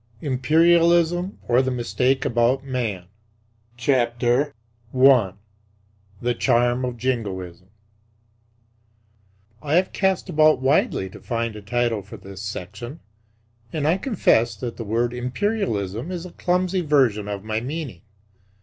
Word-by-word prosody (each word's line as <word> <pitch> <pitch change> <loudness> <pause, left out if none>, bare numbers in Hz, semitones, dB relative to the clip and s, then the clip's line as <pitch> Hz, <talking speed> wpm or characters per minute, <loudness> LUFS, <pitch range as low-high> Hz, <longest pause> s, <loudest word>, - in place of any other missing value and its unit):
IMPERIALISM, 170 +6 +3
OR 120 +1 +4
THE 130 - -1
MISTAKE 125 +2 0
ABOUT 120 +3 +2
MAN 120 -9 -3 0.8
I. 120 -2 +2 0.9
THE 120 +2 0
CHARM 120 +1 +2
OF 125 -1 -4
JINGOISM 95 -8 -3 1.9
I 150 +1 0
have 185 +1 +2
cast 190 -2 0
about 155 -1 +4
widely 130 -7 +1
to 95 - -12
find 115 -2 -2
a 105 - -8
title 120 0 0
for 100 - -11
this 95 -1 -10
section; 105 - -7 0.7
and 150 -2 -1
I 175 +5 +2
confess 120 - +2
that 120 +3 -6
the 115 - -4
word 115 +3 0
"Imperialism" 125 - -2
is 180 -1 -5
a 180 - -9
clumsy 180 +2 0
version 130 -10 +2
of 100 -1 -5
my 110 0 -2
meaning. 130 - -5
125 Hz, 120 wpm, -23 LUFS, 115-150 Hz, 1.9 s, OR